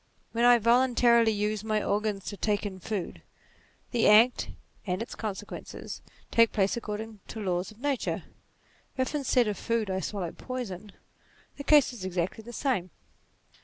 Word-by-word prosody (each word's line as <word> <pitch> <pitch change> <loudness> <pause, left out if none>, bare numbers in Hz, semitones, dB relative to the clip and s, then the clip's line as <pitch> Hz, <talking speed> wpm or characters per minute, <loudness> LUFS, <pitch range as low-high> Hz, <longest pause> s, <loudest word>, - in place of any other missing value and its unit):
When 235 +1 +2
I 245 0 +8
voluntarily 235 0 +4
use 210 0 -1
my 215 -1 0
organs 205 -1 -1
to 205 - -4
take 205 0 0
in 190 -2 -5
food, 195 0 -4 0.7
the 235 -3 +3
act, 225 +4 +5 0.4
and 180 0 -1
its 230 - -5
consequences, 210 -2 -6 0.3
take 230 -1 +5
place 195 -2 +1
according 220 -1 -5
to 225 - -7
laws 180 -3 -1
of 215 - -15
nature: 280 -1 -1 0.7
if 260 +2 0
instead 260 -5 +2
of 210 - -2
food 230 -4 -1
I 190 - 0
swallow 190 -4 -3
poison, 215 -6 -6 0.7
the 285 - -6
case 290 -3 +5
is 225 -6 -8
exactly 185 +4 -2
the 240 - -9
same. 235 -7 -1
220 Hz, 155 wpm, -28 LUFS, 200-240 Hz, 0.7 s, I